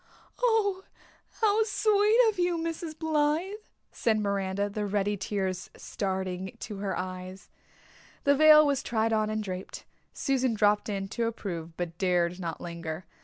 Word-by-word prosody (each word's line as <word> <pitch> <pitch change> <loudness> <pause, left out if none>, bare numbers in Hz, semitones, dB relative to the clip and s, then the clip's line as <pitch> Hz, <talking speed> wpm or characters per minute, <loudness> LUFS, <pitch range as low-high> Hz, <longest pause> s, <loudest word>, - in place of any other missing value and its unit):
"Oh, 420 -6 +2 0.6
how 430 -1 +4
sweet 425 0 +3
of 410 -4 -4
you, 350 -1 +2
Mrs. 330 -1 -4
Blythe," 315 +3 +1 0.4
said 225 -2 +1
Miranda, 200 -1 -1
the 205 0 -3
ready 205 0 0
tears 190 -2 -3
starting 190 +1 -4
to 210 - -6
her 195 0 -2
eyes. 185 +1 -6 0.7
The 285 - +5
veil 305 +1 +8
was 280 -2 +1
tried 225 -1 0
on 215 -1 +1
and 215 0 -2
draped. 185 -2 -6 0.3
Susan 260 -4 0
dropped 210 0 +2
in 195 -1 -2
to 230 +2 -1
approve 170 -7 -5
but 170 -1 -5
dared 180 -1 +1
not 170 -2 -4
linger. 170 0 -6
210 Hz, 145 wpm, -28 LUFS, 190-310 Hz, 0.7 s, veil